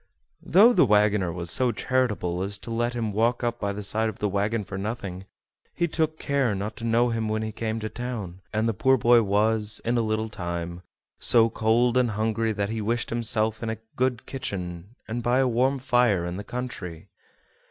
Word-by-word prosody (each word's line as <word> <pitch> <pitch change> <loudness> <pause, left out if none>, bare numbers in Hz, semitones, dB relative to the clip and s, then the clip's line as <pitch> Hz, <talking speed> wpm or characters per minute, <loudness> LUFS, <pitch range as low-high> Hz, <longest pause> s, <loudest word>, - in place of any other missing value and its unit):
Though 215 +8 +6
the - - +5
wagoner 105 -5 +3
was 85 0 -5
so 125 -2 +2
charitable 105 -10 -1
as 100 +1 -2
to 115 - -8
let 120 +1 -1
him 110 -3 -2
walk 115 +4 +1
up 120 0 -1
by 100 -1 -1
the 105 +1 -5
side 110 +2 +1
of 110 - -8
the 105 - 0
wagon 105 +3 0
for 95 0 -8
nothing, 95 -2 -5 0.5
he 170 - +1
took 160 -1 -1
care 140 -8 0
not 100 +3 -4
to - - -8
know 115 +1 +3
him 115 -2 -1
when 110 0 -1
he 110 - -3
came 110 +1 -3
to 110 - -2
town, 110 -7 -6
and 110 +1 0
the 115 - +1
poor 130 +6 +3
boy 120 +1 +5
was, 105 +1 +1
in 120 +1 +1
a - - +2
little 110 0 -1
time, 85 -3 -5 0.4
so 115 -1 +5
cold 115 +3 +2
and 125 -2 +3
hungry 110 +1 0
that 100 -1 -2
he 110 0 -3
wished 115 +3 -1
himself 110 -1 0
in 115 - -3
a 110 - -3 0.2
good 125 -2 0
kitchen 95 -5 -5
and 120 +2 -3
by 120 +2 +2
a 135 -1 +3
warm 130 +3 +2
fire 120 -8 +2
in 90 +1 -4
the 100 - -5
country. 110 -10 -6
110 Hz, 205 wpm, -26 LUFS, 100-120 Hz, 0.5 s, Though